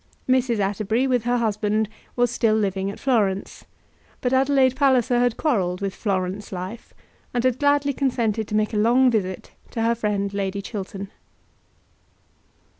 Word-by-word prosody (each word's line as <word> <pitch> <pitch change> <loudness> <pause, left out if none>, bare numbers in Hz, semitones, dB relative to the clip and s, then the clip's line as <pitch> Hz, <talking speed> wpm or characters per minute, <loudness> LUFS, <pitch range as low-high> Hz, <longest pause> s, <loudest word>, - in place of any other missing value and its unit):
Mrs. 255 -2 +2
Atterbury, 210 +5 0
with 250 -3 +1
her 245 0 +2
husband, 215 -1 0 0.3
was 245 -1 +2
still 225 -2 +2
living 195 -2 0
at 200 - -8
Florence; 205 -7 0 0.5
but 250 0 -1
Adelaide 265 -1 +3
Palliser 255 -3 +3
had 245 -1 +1
quarrelled 190 - 0
with 195 -1 -3
Florence 195 -1 -2
life, 185 +5 -7 0.4
and 240 - +1
had 255 -1 +1
gladly 285 0 +2
consented 230 -6 0
to 210 - -3
make 215 +1 +1
a - - 0
long 245 +4 +4
visit 190 -5 -2 0.2
to 225 - -3
her 230 +1 +3
friend 205 -3 -2
Lady 200 0 -2
Chiltern. 200 -1 -6
220 Hz, 150 wpm, -23 LUFS, 200-250 Hz, 0.5 s, long